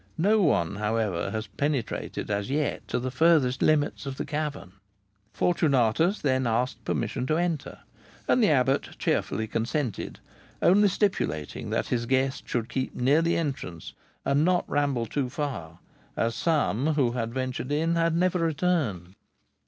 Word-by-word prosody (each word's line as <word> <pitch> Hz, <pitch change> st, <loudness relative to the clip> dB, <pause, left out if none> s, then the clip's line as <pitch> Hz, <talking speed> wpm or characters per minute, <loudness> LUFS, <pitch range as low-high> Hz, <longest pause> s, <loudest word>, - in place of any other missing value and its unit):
No 210 Hz, +6 st, +3 dB
one, 100 Hz, -, +2 dB
however, 105 Hz, -4 st, -1 dB
has 110 Hz, 0 st, -3 dB
penetrated 140 Hz, -7 st, -3 dB
as 100 Hz, +1 st, -1 dB
yet 145 Hz, +2 st, -1 dB
to -, -, -1 dB
the 130 Hz, +1 st, -3 dB
furthest 135 Hz, -3 st, +3 dB
limits 145 Hz, -2 st, +1 dB
of 135 Hz, -1 st, -5 dB
the -, -, -3 dB
cavern." 150 Hz, -, -4 dB, 0.6 s
Fortunatus 160 Hz, -, +2 dB
then 130 Hz, -3 st, +1 dB
asked 120 Hz, +3 st, -1 dB
permission 125 Hz, -1 st, -2 dB
to 155 Hz, -, +1 dB
enter, 170 Hz, -4 st, -2 dB, 0.5 s
and 255 Hz, -, +3 dB
the -, -, +5 dB
abbot 135 Hz, -1 st, +1 dB
cheerfully 110 Hz, -, 0 dB
consented, 115 Hz, +2 st, -3 dB, 0.4 s
only 205 Hz, +3 st, +5 dB
stipulating 180 Hz, -, -1 dB
that -, -, -1 dB
his 120 Hz, -1 st, -1 dB
guest 130 Hz, +1 st, 0 dB
should 115 Hz, -2 st, -1 dB
keep 130 Hz, +1 st, -3 dB
near 140 Hz, +6 st, +3 dB
the 170 Hz, +1 st, +1 dB
entrance 130 Hz, -, -4 dB, 0.3 s
and 140 Hz, +2 st, +3 dB
not 180 Hz, +1 st, +2 dB
ramble 140 Hz, -5 st, 0 dB
too 130 Hz, +3 st, -2 dB
far, 125 Hz, -, -4 dB, 0.4 s
as 115 Hz, 0 st, +1 dB
some 150 Hz, -1 st, +1 dB
who 130 Hz, -5 st, +2 dB
had 115 Hz, -2 st, -3 dB
ventured 130 Hz, +1 st, -3 dB
in 160 Hz, +3 st, +1 dB
had 165 Hz, -1 st, +2 dB
never 180 Hz, +1 st, +2 dB
returned. 150 Hz, -, 0 dB
135 Hz, 150 wpm, -27 LUFS, 115-160 Hz, 0.6 s, the